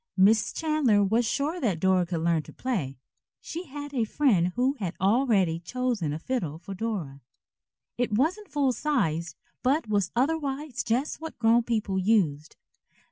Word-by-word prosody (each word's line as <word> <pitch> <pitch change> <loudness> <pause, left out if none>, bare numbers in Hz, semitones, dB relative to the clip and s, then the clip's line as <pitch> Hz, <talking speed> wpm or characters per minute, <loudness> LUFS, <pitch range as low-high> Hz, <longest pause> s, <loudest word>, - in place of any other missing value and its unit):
Miss 215 +4 +4
Chandler 300 -10 +2
was 225 +4 +2
sure 295 +8 -1
that 195 -9 0
Dora 185 0 +2
could 170 -2 -2
learn 165 -1 +2
to - - -13
play. 180 - -3 0.4
She 340 +3 -6
had 290 0 -8
a 245 -4 +1
friend 215 -7 +2
who 255 +3 +2
had 185 -4 -3
already 195 -5 +2
chosen 230 -4 -2
a 150 - -2
fiddle 165 - -3
for 195 +4 -8
Dora. 185 -10 -4 0.8
It 245 -2 0
wasn't 335 - +1
full 275 -3 +1
sized, 170 - -1 0.3
but 275 +2 +1
was 200 -4 +1
otherwise 275 -2 -1
just 250 +8 -1
what 320 0 -7
grown 230 +1 +4
people 215 -5 -1
used. 180 -7 +1
225 Hz, 155 wpm, -27 LUFS, 180-270 Hz, 0.8 s, Miss